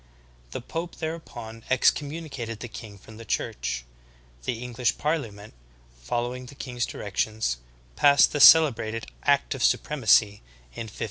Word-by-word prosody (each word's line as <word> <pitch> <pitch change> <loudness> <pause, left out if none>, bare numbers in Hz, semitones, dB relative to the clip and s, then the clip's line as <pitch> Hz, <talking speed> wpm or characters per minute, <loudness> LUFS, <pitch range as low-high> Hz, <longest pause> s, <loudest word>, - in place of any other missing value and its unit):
The - - -6
pope 165 +7 -5
thereupon 120 -9 -7
ex 130 -1 +5
communicated 140 -7 -6
the 120 - -6
king 110 -3 -10
from 110 +3 -14
the 115 - -9
Church. 60 - -3 0.6
The 120 +1 -3
EngMsh 125 0 0
parli 150 -5 -1
ament, 100 +1 -13 0.5
following 120 - -3
the 140 - -12
king's 125 -3 -3
directions, 105 - -2 0.4
passed 140 - +5
the 145 - -2
celebrated 115 -8 +6 0.2
Act 140 -1 +2
of 135 - -4
Supremacy 110 -7 +3 0.3
in 115 - -6
1534. - - -15
120 Hz, 140 wpm, -26 LUFS, 110-140 Hz, 0.6 s, celebrated